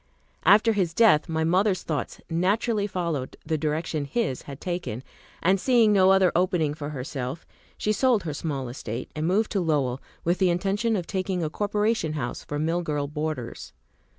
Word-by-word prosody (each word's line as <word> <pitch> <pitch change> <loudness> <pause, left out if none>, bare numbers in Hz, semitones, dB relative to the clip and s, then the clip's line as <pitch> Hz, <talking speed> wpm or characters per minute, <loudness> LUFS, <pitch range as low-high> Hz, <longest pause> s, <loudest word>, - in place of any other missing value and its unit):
After 220 +2 +6
his 180 -5 0
death, 205 -11 +5
my 160 0 0
mother's 185 +3 +2
thoughts 150 -3 -3
naturally 205 +5 +1
followed 170 -9 -3
the 160 0 0
direction 155 0 -1
his 140 - -1
had 140 0 -8
taken; 175 -10 -4 0.4
and 190 +2 +4
seeing 230 -2 +4
no 190 -2 +5
other 190 -2 +5
opening 175 -4 +2
for 150 -1 -6
herself, 135 +1 -5 0.3
she 210 - 0
sold 240 -1 +2
her 155 -3 -3
small 140 -4 -3
estate, 120 -1 -6
and 155 +1 -1
moved 210 +5 +1
to 200 - +1
Lowell, 140 -6 0 0.2
with 175 +2 +1
the 190 -2 +4
intention 200 +6 0
of 180 -4 -2
taking 185 -2 -2
a 155 - -2
corporation 210 -4 0
house 130 -6 -4
for 145 - -4
mill 165 +3 0
girl 150 -4 -2
boarders. 150 -4 -5
170 Hz, 175 wpm, -26 LUFS, 150-195 Hz, 0.4 s, After